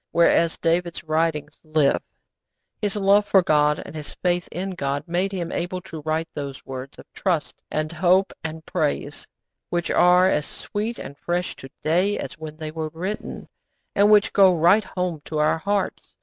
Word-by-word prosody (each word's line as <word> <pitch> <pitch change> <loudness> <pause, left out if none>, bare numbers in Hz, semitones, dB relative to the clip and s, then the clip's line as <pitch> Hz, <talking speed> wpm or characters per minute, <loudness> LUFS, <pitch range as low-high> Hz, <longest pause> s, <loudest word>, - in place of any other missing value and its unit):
Whereas 170 -1 +3
David's 170 +1 0
writings 155 -2 -1
live. 155 - +2 0.8
His 205 0 -1
love 205 0 +4
for 190 -2 +5
God, 150 -3 +3
and - - -9
his 150 -1 -7
faith 175 -1 0
in 190 +2 -3
God, 140 -5 -2
made 180 +3 0
him 180 -4 -3
able 180 +1 -2
to 160 -3 -8
write 160 +2 -1
those 140 -2 -6
words 135 +1 -7
of - - -12
trust 175 -6 -1
and 155 +1 -2
hope 180 +3 +3
and 160 0 -6
praise 150 -4 -2 0.4
which 175 -1 -1
are 180 +1 +5
as 150 -5 +1
sweet 220 +3 -4
and 140 - -8
fresh 175 +1 -2
to 135 - -10
day 180 +6 +2
as - - -5
when 155 +1 -9
they 155 -1 -5
were 155 0 -4
written, 185 +7 -5 0.5
and 200 +1 +4
which 210 -1 +5
go 190 -3 +6
right 180 +7 +5
home 180 -4 -3
to 155 - -4
our 150 +2 +2
hearts. 200 +2 -2
170 Hz, 175 wpm, -23 LUFS, 155-185 Hz, 0.8 s, go